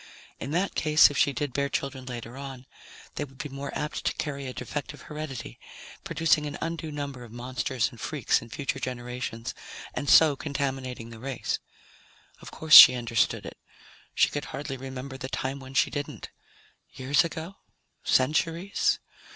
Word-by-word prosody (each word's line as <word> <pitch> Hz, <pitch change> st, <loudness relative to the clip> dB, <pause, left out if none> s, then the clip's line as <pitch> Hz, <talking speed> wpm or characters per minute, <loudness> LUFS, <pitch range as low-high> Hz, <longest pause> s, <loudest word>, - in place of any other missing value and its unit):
In -, -, -5 dB
that 180 Hz, +6 st, 0 dB
case, 155 Hz, -1 st, +5 dB
if 140 Hz, -, -5 dB
she 145 Hz, -, +4 dB
did 140 Hz, 0 st, -3 dB
bear 140 Hz, +1 st, 0 dB
children 135 Hz, -2 st, -3 dB
later 120 Hz, -1 st, -7 dB
on, 135 Hz, -2 st, -8 dB, 0.5 s
they -, -, -3 dB
would 135 Hz, -2 st, -11 dB
be 150 Hz, -, -5 dB
more 140 Hz, +1 st, -6 dB
apt 150 Hz, -, -3 dB
to -, -, +1 dB
carry 140 Hz, -3 st, -4 dB
a -, -, -4 dB
defective 150 Hz, +3 st, -6 dB
heredity, 150 Hz, -5 st, -7 dB, 0.4 s
producing 155 Hz, -2 st, +2 dB
an 145 Hz, -, -5 dB
undue 165 Hz, -1 st, -4 dB
number 140 Hz, -4 st, -5 dB
of 115 Hz, -, -12 dB
monsters 125 Hz, +1 st, -2 dB
and -, -, -13 dB
freaks -, -, +1 dB
in -, -, -12 dB
future 135 Hz, +2 st, -3 dB
generations, 125 Hz, -2 st, -5 dB, 0.4 s
and 145 Hz, -, -3 dB
so 155 Hz, -1 st, +7 dB
contaminating 135 Hz, -5 st, -4 dB
the 115 Hz, -, -10 dB
race. 130 Hz, +1 st, -3 dB, 0.8 s
Of -, -, -9 dB
course 160 Hz, -1 st, -2 dB
she 125 Hz, -, +13 dB
understood 115 Hz, -2 st, 0 dB
it. -, -, -9 dB, 0.6 s
She -, -, +4 dB
could 145 Hz, -, -4 dB
hardly 135 Hz, 0 st, -5 dB
remember 130 Hz, 0 st, -7 dB
the 130 Hz, -, -5 dB
time 135 Hz, +1 st, -3 dB
when 130 Hz, 0 st, -11 dB
she -, -, +3 dB
didn't. 145 Hz, 0 st, -5 dB, 0.6 s
Years 140 Hz, +6 st, +2 dB
ago? 170 Hz, +3 st, -6 dB, 0.5 s
Centuries? 165 Hz, +8 st, +2 dB
135 Hz, 165 wpm, -27 LUFS, 130-150 Hz, 0.8 s, she